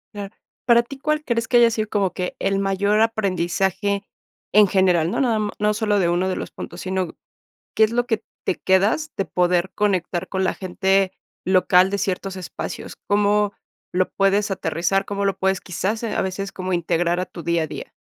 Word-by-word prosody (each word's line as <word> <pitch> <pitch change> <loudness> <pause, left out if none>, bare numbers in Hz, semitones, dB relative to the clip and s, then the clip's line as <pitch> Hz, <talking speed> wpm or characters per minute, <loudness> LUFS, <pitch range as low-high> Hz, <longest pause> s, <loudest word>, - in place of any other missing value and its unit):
Claro. 200 0 -6 0.3
¿Para 235 -1 +6
ti 255 +3 -10
cuál 305 +2 -1
crees 230 -1 -1
que 245 - +5
haya 235 -1 +6
sido 220 -1 -2
como 200 -4 0
que 180 0 -4
el 195 0 0
mayor 200 +2 +1
aprendizaje 195 -1 0 0.5
en 210 0 +7
general? 180 -4 +2
No, - - -1
nada 245 -4 +2
m 210 -1 -1
no 210 0 +2
solo 210 -1 +1
de 180 - +2
uno 175 +2 +1
de 185 - -2
los - - -5
puntos, - - -8
sino, 185 -2 -3 0.6
¿qué 220 - +5
es 215 - +3
lo 245 +1 +1
que 225 -2 -1 0.2
te - - +1
quedas 205 +12 +1
de 195 - 0
poder 180 +1 +1
conectar 185 -3 0
con 190 0 0
la - - +1
gente 190 +1 +1 0.3
local 185 0 +4
de 200 - -1
ciertos 195 0 -2
espacios? 185 - -6
¿Cómo 205 0 +3 0.4
lo 185 +1 +2
puedes 200 +1 +1
aterrizar? 190 +1 0
¿Cómo 200 0 -3
lo 195 -2 +1
puedes 190 0 +1
quizás 195 +5 -3
a 220 - -1
veces 195 +1 -4
como 185 0 -4
integrar 175 0 +1
a 185 - -1
tu 170 - -10
día 170 0 +1
a - - -3
día? - - -8
195 Hz, 195 wpm, -22 LUFS, 185-210 Hz, 0.6 s, en